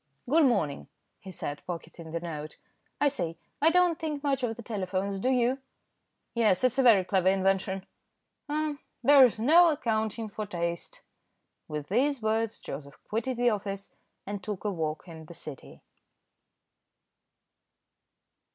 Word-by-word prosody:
"Good 310 +4 +5
morning," 195 - 0 0.3
he 190 - -11
said, 145 -5 -5
pocketing 170 -1 -7
the 170 - -2
note. 155 -3 -6 0.4
"I 290 - +4
say, 170 - -2 0.2
I 315 - +6
don't 355 -1 +3
think 305 -3 -3
much 275 -2 +1
of 225 -3 -2
telephones, 195 -2 -2
do 255 - +1
you?" 255 +1 +2 0.7
"Yes, 220 -5 +3
it's 255 +1 +2
a - - +7
very 225 -7 +6
clever 185 -1 +1
invention." 190 0 +1 0.6
"Ah! 300 0 -1 0.3
there's 260 -4 +7
no 330 +9 +6
accounting 220 -5 -1
for 210 0 -5
taste." 170 -2 -4 0.6
With 150 -1 -5
these 270 +7 +2
words 220 0 0
Joseph 140 0 -8
quitted 230 +3 -1
the 245 0 +3
office, 200 -1 -4 0.3
and 205 0 -5
took 210 -3 -5
a 210 - 0
walk 160 -2 -3
in 165 -2 -9
the 170 - -10
City. 150 -4 -10
210 Hz, 140 wpm, -29 LUFS, 180-255 Hz, 0.7 s, a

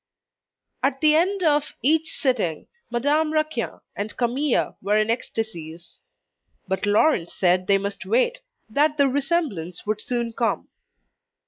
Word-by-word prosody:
At 270 0 0
the 305 0 +5
end 370 +4 +2
of 300 -2 +2
each 315 +3 +3
sitting, 220 - 0 0.2
Madame 290 +6 +1
Raquin 310 -6 -1
and 205 +1 -4
Camille 255 +3 0
were 205 +1 +2
in 215 +1 +2
ecstasies. 175 -8 -5 0.7
But 190 +2 -1
Laurent 205 - +3
said 185 0 +1
they 200 - +5
must 200 0 -4
wait, - - +2 0.3
that 295 +6 +2
the 280 -1 +4
resemblance 270 - -1
would 210 0 -1
soon 235 -1 -2
come. 230 0 -1
245 Hz, 130 wpm, -24 LUFS, 205-305 Hz, 0.7 s, the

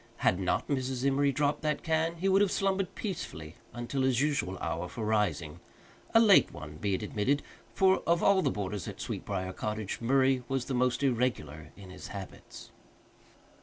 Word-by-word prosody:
Had 90 - +3
not 95 - 0
Mrs. 130 -2 -2
Emory 140 +1 +3
dropped 145 +2 0
that 150 -1 -1
can, 165 0 0
he 180 +3 -2
would 195 +1 +4
have 200 -2 +3
slumbered 195 -1 0
peacefully 80 - -5 0.2
until 120 +3 -3
his 130 -2 +2
usual 135 - 0
hour 85 +1 -3
for 115 - -5
rising 100 -9 0 0.6
a - - +9
late 215 -4 +6
one, 75 0 -9
be 100 +4 0
it 100 - -5
admitted, 120 +8 0 0.3
for 190 -1 +4
of 170 0 +2
all 200 -1 +5
the - - +1
boarders 100 -1 -4
at - - -7
Sweetbriar 95 -2 -4
Cottage 105 +1 -4
Murray 130 +1 +3
was 135 -2 -1
the 135 - -4
most 125 +2 +1
irregular 115 - -1
in 95 -2 -11
his 90 - -9
habits. 95 -2 -10
125 Hz, 175 wpm, -30 LUFS, 95-150 Hz, 0.6 s, a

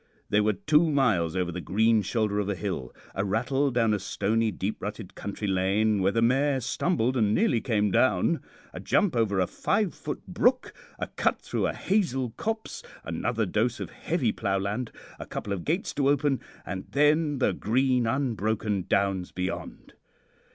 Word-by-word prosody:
They 105 - +4
were 105 +1 +2
two 155 - +3
miles 110 - +2
over 90 -2 0
the 90 +1 -5
green 110 +4 +3
shoulder 105 0 0
of 105 -1 -1
a 100 - 0
hill, 85 -9 -4 0.2
a 95 - -1
rattle 125 +8 +1
down 115 -4 +2
a 105 - 0
stony, 110 +3 0
deep 100 +1 -4
rutted 105 -1 -6
country 105 +1 -5
lane, 100 +2 +2
where 95 +1 +3
the 115 +2 +1
mare 135 +3 +3
stumbled 130 0 0
and 105 -4 +2
nearly 140 - +2
came 105 -4 +1
down, - - +2 0.3
a - - -6
jump 200 -8 +1
over 105 -4 +1
a 90 - +3
5ft. 170 - -1
brook, 250 +8 +1 0.2
a - - -2
cut - - 0
through - - -1
a - - -2
hazel 135 - 0
copse, 220 - -4 0.2
another - - -1
dose - - 0
of - - -5
heavy 140 -10 -1
ploughland, 100 +4 -2 0.3
a - - -7
couple 100 - -4
of 90 -4 -4
gates 175 +6 -1
to 140 -1 +2
open, 145 -1 +2 0.3
and 95 +1 -5
then 150 +1 +3
the 130 - +2
green, 125 +1 +1
unbroken 110 -6 -1
Downs 95 -2 +1
beyond. 90 +1 -5
110 Hz, 170 wpm, -27 LUFS, 100-135 Hz, 0.3 s, They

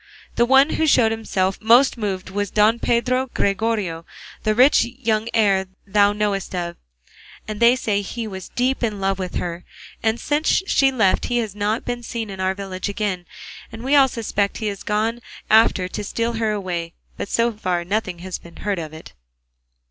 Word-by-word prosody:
The 235 - +2
one 270 +3 +5
who 320 - +1
showed 230 -6 +4
himself 195 -4 -1
most 240 +5 +5
moved 195 -5 -4
was 205 0 -2
Don 215 +4 +3
Pedro 255 +3 +1
Gregorio, 200 -5 0 0.4
the 215 0 +1
rich 255 +5 +6
young 225 -2 -2
heir 195 -4 +2 0.2
thou 200 +1 +3
knowest 205 -2 -2
of, 170 -1 -3 0.7
and 215 -1 -5
they 235 +1 +6
say 210 -5 -1
he 230 +3 -5
was 190 -4 -7
deep 255 +2 0
in 215 -4 -1
love 195 0 0
with 185 -1 -4
her; 175 0 -3 0.4
and 225 0 0
since 305 +5 +1
she 270 -8 +3
left 220 -8 +2
he 245 - -1
has 220 -5 -2
not 210 +2 -1
been 245 0 -3
seen 230 -3 -5
in 190 - -8
our 190 0 0
village 195 0 -5
again, 200 -4 -3 0.4
and 225 0 -9
we 275 +3 +2
all 275 -2 +7
suspect 210 -4 -2
he 220 - -4
has 200 - -13
gone 220 +3 -1 0.3
after 220 -4 +5
her 180 - -4
to 210 - -5
steal 230 +3 -2
her 225 -1 0
away, 175 -5 -3 0.2
but - - -5
so 235 0 +2
far 185 -4 -2
nothing 195 -1 -2
has 185 - -4
been 170 - -15
heard 205 -3 -2
of 155 -2 -7
it." 160 - -11
210 Hz, 190 wpm, -21 LUFS, 190-235 Hz, 0.7 s, all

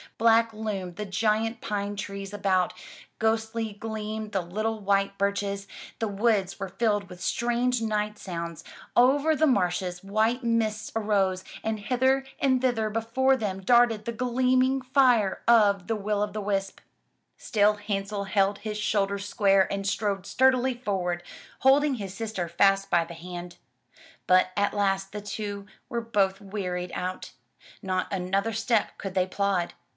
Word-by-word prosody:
Black 230 0 +4
loomed 200 -5 -4
the 210 - -3
giant 220 +3 0
pine 205 -1 -3
trees 200 0 -6
about, 190 -3 +1 0.5
ghostly 220 0 0
gleamed 215 0 -5
the 195 -2 0
little 215 +6 -3
white 195 -1 +1
birches, 200 0 -1 0.3
the 225 - 0
woods 200 -2 0
were 195 - -4
filled 205 -1 0
with 180 -1 -11
strange 240 +5 0
night 210 -1 -1
sounds, 170 -3 -6 0.3
over 280 +6 +4
the 315 +2 +3
marshes 180 -5 0
white 220 +5 +1
mists 225 -2 0
arose, 195 -4 +1 0.2
and 220 -1 -2
hither 260 +4 +2 0.2
and 260 -2 +2
thither 235 -4 +1
before 230 +5 +2
them 200 -6 -3
darted 230 0 +4
the 235 - -2
gleaming 255 +2 +2
fire 250 -6 +3
of 205 -5 +5
the 225 - 0
will 210 0 -1
o' 210 - +1
the 210 +1 -5
wisp. 195 -1 -2 0.6
Still 210 -2 +2
Hansel 200 -1 -3
held 195 +1 +1
his 215 -1 -4
shoulders 200 -1 0
square 195 -3 +3
and 195 0 -2
strode 200 -2 -1
sturdily 260 +1 +3
forward, 180 -7 -2 0.4
holding 275 +1 +4
his 200 -5 -6
sister 215 -5 -3
fast 195 +3 +3
by 170 -2 +3
the 170 - -10
hand. 175 +1 -8 0.7
But 185 0 +4
at 200 0 +1
last 195 -1 0
the 210 - -5
two 205 -1 -5 0.2
were 235 - -2
both 200 -4 0
wearied 180 -3 -4
out. 185 +1 -4 0.5
Not 185 -1 -1
another 195 +3 -1
step 225 0 0
could 195 -2 -5
they 185 -1 +3
plod. 190 -2 0
205 Hz, 150 wpm, -27 LUFS, 195-225 Hz, 0.7 s, of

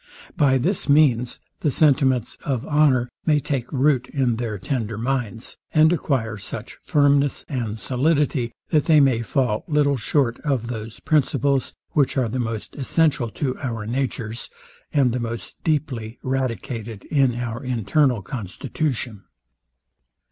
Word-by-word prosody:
By 135 -2 +4
this 165 +6 -1
means 125 -5 +4 0.2
the 150 - +1
sentiments 130 -4 +3
of 130 -5 -2
honour 145 -5 +3 0.2
may 150 -2 +4
take 135 -4 -3
root 135 -2 +2
in 130 -5 0
their 115 -3 -3
tender 110 +1 -3
minds, 120 -2 -3 0.2
and 155 +2 +6
acquire 120 -9 -1
such 100 - -7
firmness 145 -1 +2
and 115 -6 -3
solidity, 135 -1 +1 0.2
that 155 -4 +3
they 155 -2 +6
may 130 -5 +4
fall 115 -1 0
little 145 -3 +2
short 125 +1 0
of 130 -6 -1
those 110 -2 -6
principles, 140 -3 +1 0.2
which 140 -2 +2
are 125 -3 +1
the 130 - -2
most 115 -3 -4
essential 145 -2 +1
to 130 +5 -2
our 115 -5 -3
natures, 115 -2 -3 0.4
and 135 -4 +3
the 125 - -1
most 115 -3 -6
deeply 130 -7 -1
radicated 120 -4 -3
in 135 -5 +3
our 120 0 -4
internal 125 0 +1
constitution. 115 - -4
130 Hz, 135 wpm, -23 LUFS, 115-145 Hz, 0.4 s, and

